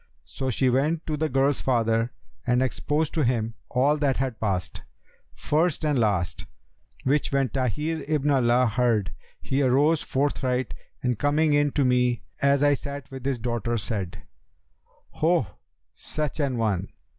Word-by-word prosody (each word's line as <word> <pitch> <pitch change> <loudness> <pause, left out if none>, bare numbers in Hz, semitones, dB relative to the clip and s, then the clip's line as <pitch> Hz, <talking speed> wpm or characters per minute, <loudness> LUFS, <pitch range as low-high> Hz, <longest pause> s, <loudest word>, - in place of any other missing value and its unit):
So 130 -1 -4
she 130 +2 +1
went 150 +6 +1
to 155 - -2
the 155 +1 -1
girl's 135 +1 +2
father 115 -2 +1 0.4
and 125 +1 +3
exposed 150 +4 -1
to 160 - +1
him 115 -3 0 0.2
all 140 +4 +2
that 140 -3 +1
had 130 -3 -2
passed, 95 -6 -2 0.5
first 155 +1 0
and 145 -4 +2
last, 100 -6 0 0.6
which 140 +3 +1
when 135 -2 +1
Tahir 150 +5 -2
ibn 150 -1 +1
Alaa 125 -2 +3
heard 115 -6 +1 0.3
he 135 +2 0
arose 145 +5 +3
forthright 130 -2 -1 0.3
and 125 -3 0
coming 150 +1 +2
in 145 0 +3
to 140 - +2
me, 125 -1 +2 0.2
as 140 0 +3
I 145 0 +5
sat 140 0 -6
with 130 -1 -8
his 135 -2 0
daughter, 120 0 -2
said, 100 -4 -4 0.9
'Ho, 165 -4 +2 0.5
such 155 0 -4
an 135 -4 0
one!' 100 -5 0
130 Hz, 150 wpm, -25 LUFS, 120-145 Hz, 0.9 s, I